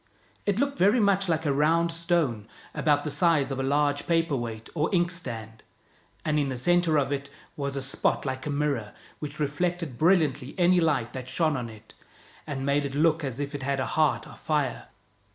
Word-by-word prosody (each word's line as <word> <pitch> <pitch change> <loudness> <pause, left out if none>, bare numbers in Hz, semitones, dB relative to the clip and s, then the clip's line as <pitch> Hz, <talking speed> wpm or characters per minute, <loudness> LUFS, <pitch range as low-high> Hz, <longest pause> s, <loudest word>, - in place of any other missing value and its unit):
It 205 -1 +2
looked 280 +2 0
very 205 +7 +5
much 195 -3 +2
like 160 -1 0
a 145 - +2
round 165 +4 +2
stone, 165 - 0 0.3
about 145 -1 +2
the 150 - -3
size 160 -4 +2
of 135 - -3
a - - +1
large 145 +1 +1
paper 165 -3 +2
weight 115 -3 -5
or 155 -1 0
ink 175 -2 +2
stand, 110 - -6 0.6
and 150 -1 +2
in 140 -2 0
the 130 - -3
center 175 +3 +3
of 140 -1 +1
it 140 0 -3 0.3
was 140 -1 -3
a 135 - -2
spot 135 - 0
like 130 +1 -3
a - - -2
mirror, 140 -7 -1 0.2
which 150 0 -6
reflected 150 -1 -2
brilliantly 155 -6 +2
any 180 0 +4
light 145 -8 +1
that 130 -1 -6
shone 155 +3 +1
on 120 -3 -4
it, 110 0 -14 0.5
and 135 -2 -3
made 140 +1 +2
it 140 -1 -4
look 160 +1 +3
as 135 -2 -3
if 145 0 -3
it 145 - -4
had 135 +1 -1
a 130 - 0
heart 155 -1 +2
of 150 - -13
fire. 150 -5 -1
145 Hz, 205 wpm, -27 LUFS, 135-165 Hz, 0.6 s, very